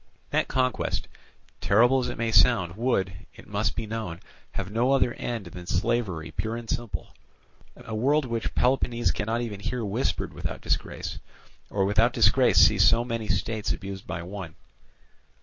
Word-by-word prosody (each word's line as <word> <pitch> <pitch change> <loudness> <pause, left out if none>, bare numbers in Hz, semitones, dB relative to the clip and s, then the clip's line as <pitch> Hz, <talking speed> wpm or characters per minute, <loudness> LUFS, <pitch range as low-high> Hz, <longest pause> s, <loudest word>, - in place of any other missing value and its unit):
That - - +1
conquest, 130 -1 0 0.5
terrible 120 +6 +4
as 125 - -2
it 120 - -5
may 115 0 -1
sound, 100 -9 +4
would, 105 -5 0 0.2
it - - -13
must 105 +1 -1
be 115 - -3
known, 105 -6 -5 0.3
have 100 0 -4
no 120 +5 +2
other 125 -3 +3
end 115 -4 -4
than 90 0 -9
slavery 90 -3 -1
pure 110 +1 -3
and 120 -1 -8
simple; 120 -3 -4 0.6
a - - -9
word 140 +7 +2
which 115 -2 -3
Peloponnese 120 -2 +2
cannot 115 +3 -2
even 110 -4 -4
hear 115 +3 -3
whispered 105 +6 -1
without - - -5
disgrace, - - -2 0.5
or 100 -1 +1
without 110 +5 +3
disgrace - - +4
see - - +6
so 120 +1 +5
many 115 -2 -3
states 110 -1 -1
abused 95 -1 -7
by 85 -1 -4
one. 90 -3 -7
110 Hz, 160 wpm, -26 LUFS, 100-120 Hz, 0.6 s, see